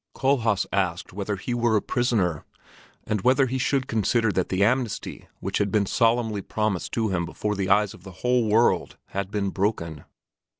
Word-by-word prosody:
Kohlhaas 115 -7 +2
asked 90 -3 -1
whether 100 +1 -2
he 110 +6 -4
were 120 -2 +2
a - - +4
prisoner, 105 -10 0 0.6
and 105 -2 -1
whether 130 +5 +4
he 130 +1 -2
should 135 0 +1
consider 115 -1 +1
that 95 -3 -1
the 95 +1 +1
amnesty 120 0 -1
which 95 +1 -2
had 100 -1 0
been 105 -1 +2
solemnly 115 -1 +1
promised 105 -3 -2
to 110 -2 0
him 90 -3 0
before 105 +5 -3
the 95 -1 -2
eyes 105 0 +3
of - - -15
the 95 +1 -10
whole 125 -3 +3
world 115 +3 +2
had 100 0 -3
been 100 -1 -1
broken. 85 -7 -2
105 Hz, 180 wpm, -25 LUFS, 95-120 Hz, 0.6 s, a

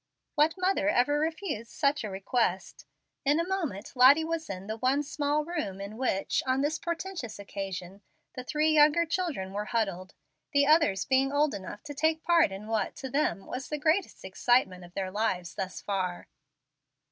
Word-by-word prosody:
What 305 +2 +3
mother 370 -5 +1
ever 290 +1 +2
refused 315 - -3
such 280 -3 0
a 215 - -3
request? 195 0 -2 0.4
In 290 +3 +3
a 335 - -1
moment 320 - -3
Lottie 270 +5 +7
was 325 0 -3
in 185 0 -5
the 220 +2 -4
one 260 +5 +1
small 295 +1 -1
room 300 - -4
in 200 +2 -7
which, 225 -6 0
on 260 +1 +2
this 300 +3 0
portentous 340 - -4
occasion, 195 -1 -6 0.3
the 255 - -6
three 305 +4 +1
younger 305 +2 +5
children 315 - -2
were 205 +1 -2
huddled, 195 -5 -2 0.4
the 285 0 +4
others 295 - +3
being 270 +1 +2
old 290 -1 +2
enough 205 +1 -7
to 295 - -7
take 315 +3 +1
part 335 - +4
in 195 +2 -7
what, 220 0 -1
to 265 -2 -7
them, 275 -8 0
was 255 +1 -6
the 300 - -2
greatest 320 - 0
excitement 190 -1 +1
of 175 0 -15
their 190 -1 -2
lives, 185 -5 -1
thus 190 +1 -5
far. 185 -3 -3
260 Hz, 175 wpm, -29 LUFS, 195-310 Hz, 0.4 s, Lottie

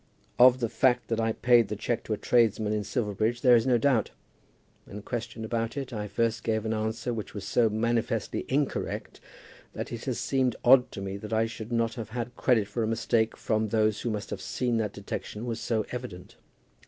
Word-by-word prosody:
Of 125 +1 +7
the 115 - +1
fact 125 +1 +1
that 115 -1 0
I 115 0 +1
paid 120 0 +4
the 105 - -3
cheque 115 +3 -2
to 110 - -1
a - - -2
tradesman 110 -3 +2
in 105 -1 -1
Silverbridge 110 +2 -1
there 125 -2 +7
is 115 +2 +2
no 125 -2 +4
doubt. 120 -2 +2 0.8
When 105 +1 -9
questioned 115 -1 -5
about 115 +3 -2
it, 135 -2 -4
I 105 -2 -3
first 115 +2 -1
gave 110 -1 -1
an 110 - 0
answer 110 +2 -2
which 110 -2 -6
was 100 - -5
so 115 -2 +3
manifestly 115 +2 -1
incorrect 140 +1 -2 0.5
that - - -5
it - - -6
has - - -2
seemed 130 -3 0
odd 125 0 +6
to 100 - -6
me 100 0 -4
that 105 +2 -7
I 110 +1 +3
should 115 0 -7
not 115 -1 +1
have 110 -2 -6
had 120 +1 -5
credit 115 -7 +2
for 110 +3 -3
a 110 - 0
mistake 110 0 0
from 110 -1 0
those 110 -1 +1
who 120 - -2
must 105 -1 -4
have - - -4
seen 120 -2 -1
that 110 -2 -1
detection 105 +2 -6
was 115 -1 -3
so 110 -2 -1
evident. 120 -8 -7
115 Hz, 210 wpm, -28 LUFS, 110-120 Hz, 0.8 s, Of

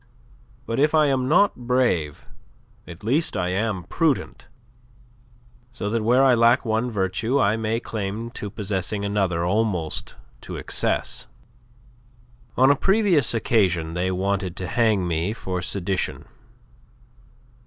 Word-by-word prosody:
But 115 - -2
if 150 +2 +3
I 155 -1 +5
am 130 -3 +1
not 180 +8 +4
brave, 105 - 0 0.6
at 85 +4 -11
least 130 +2 0
I 90 -1 -1
am 95 0 -1
prudent; 140 - -1 1.2
so 110 -4 -4
that 115 0 0
where 125 +5 +3
I 130 -2 +5
lack 120 +2 +4
one 110 +2 0
virtue 110 +5 -1
I 105 -4 +3
may 110 0 -2
lay - - -1
claim 110 +2 -4
to 105 -3 -6
possessing 100 0 -3
another 95 -4 0
almost 95 -5 -1 0.3
to - - -8
excess. - - -1 1.3
On 130 +2 +6
a - - +4
previous 190 - +2
occasion 90 -8 +1
they 90 +2 -1
wanted 95 0 -1
to 90 - -4
hang 105 -1 +1
me 85 +4 -1
for 95 -5 -4
sedition. 95 +1 -2
110 Hz, 130 wpm, -23 LUFS, 95-125 Hz, 1.3 s, On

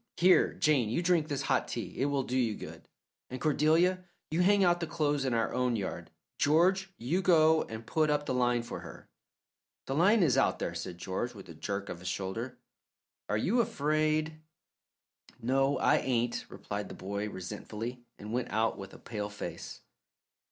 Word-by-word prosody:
"Here, 180 +1 +5
Jane, 145 -9 +2
you 170 +10 0
drink 170 -3 +2
this 145 -3 -2
hot - - +1
tea - - -5
it 135 - +2
will 140 -1 0
do 125 - -4
you 120 -5 +1
good; - - -10 0.4
and 130 - -6
Cordelia, 160 +5 +3 0.3
you 165 +3 +2
hang 200 +2 +4
out 175 -1 +3
the 170 - -3
clothes 150 -4 0
in 125 -3 +1
our 115 - 0
own 125 -1 +1
yard. 100 -4 -4 0.3
George, 185 +6 +3
you 155 +11 0
go 160 -3 +5
and 110 0 -8
put 155 +4 +1
up 145 0 +1
the - - -1
line 120 -1 +2
for - - -6
her." - - -11 0.8
"The 135 - -3
line 190 +8 +4
is 140 -7 +3
out - - +2
there," - - -3
said 85 +1 -6
George, 100 +7 -3
with 100 - -11
a - - -8
jerk 100 +5 -4
of 85 - -6
his 90 - -8
shoulder. 115 +7 -4 0.7
"Are 105 - +1
you 225 - +2
afraid?" 155 -2 0 1.0
"No, 135 +4 +2
I - - +4
ain't," 120 -2 -1
replied - - -5
the - - -8
boy 100 +2 -4
resentfully, 105 +6 -6
and 105 +2 -7
went 125 0 -1
out 110 +2 0
with 95 - -9
a - - -10
pale 105 -3 -5
face. 105 - -7
130 Hz, 185 wpm, -31 LUFS, 110-160 Hz, 1.0 s, Here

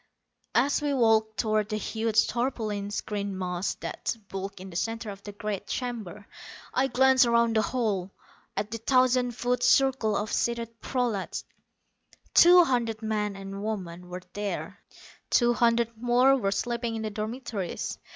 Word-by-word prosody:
As 285 +2 +3
we 290 -1 0
walked 220 -3 +3
toward 215 -1 +1
the 215 - -1
huge 220 0 +1
tarpaulin 220 -5 -2
screened 200 -1 -3
mass 180 0 -2
that - - -4
bulked 195 0 -5
in 190 +1 -9
the - - -11
center 225 +3 -2
of 195 0 -10
the 205 - -8
great 205 -1 -5
chamber, 215 -5 -5 0.5
I 265 +1 +2
glanced 265 0 +5
around 235 -1 +3
the 220 - +4
hall, 215 -6 -1 0.5
at 205 +1 -2
the 230 - -4
thousand 255 0 +2
foot 245 +1 0
circle 260 -6 +3
of 210 +1 -3
seated 230 -1 -2
prolats. 240 -7 -2 0.9
Two 355 +1 +8
hundred 235 -6 -1
men 210 -2 -1
and 195 +1 -7
women 180 -5 -5
were 180 0 -7
there; 205 -1 -4 0.5
two 240 -1 +4
hundred 235 -1 +2
more 245 +3 +4
were 210 -7 0
sleeping 235 +2 -2
in 220 - -4
the 215 - -3
dormitories. 215 -2 -4
220 Hz, 150 wpm, -27 LUFS, 205-245 Hz, 0.9 s, Two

